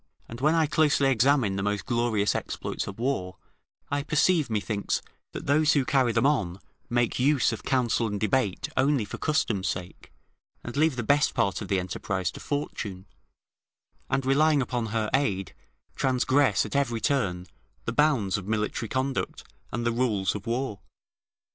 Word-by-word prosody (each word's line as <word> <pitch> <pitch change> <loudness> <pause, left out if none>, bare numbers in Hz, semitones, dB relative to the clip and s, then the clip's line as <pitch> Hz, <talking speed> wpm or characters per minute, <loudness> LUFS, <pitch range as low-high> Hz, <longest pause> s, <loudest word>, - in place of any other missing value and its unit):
] - - -38
and 115 +2 -9
when 155 +3 +3
I 165 -1 +4
closely 145 -2 +3
examine 125 -5 +3
the - - -1
most 105 0 -1
glorious 115 -4 +1
exploits - - -4
of 100 - -7
war, 110 -7 -2 0.5
I 145 0 +1
perceive, 150 0 +2
methinks, 105 -1 -1 0.3
that - - -6
those 155 +2 +4
who 140 -3 +2
carry 130 -3 +2
them 120 - +1
on 95 -11 +1 0.3
make 120 0 +1
use 135 0 +3
of 110 - -5
counsel 120 -3 +1
and 105 -1 -3
debate 110 -2 0
only 135 -3 +2
for - - -8
custom's 110 -11 0
sake, 90 -1 -6 0.5
and 120 - -7
leave 155 0 +3
the 120 - -3
best 145 +5 +2
part 100 +2 0
of 105 - -5
the 95 0 +1
enterprise 95 0 -2
to - - -10
Fortune, 105 -10 -4 1.0
and 135 - 0
relying 150 +3 +4
upon 120 -2 -1
her 110 0 -1
aid, 100 -9 0 0.4
transgress, 130 +2 +2
at - - -6
every 120 -5 +1
turn, 100 -8 0 0.4
the 115 - -2
bounds 125 -10 +2
of 95 - -10
military 110 +1 -2
conduct 130 0 -2 0.3
and 120 - -3
the 120 - +2
rules 115 -5 0
of 105 +1 -7
war. 120 -3 -2
120 Hz, 165 wpm, -27 LUFS, 105-140 Hz, 1.0 s, I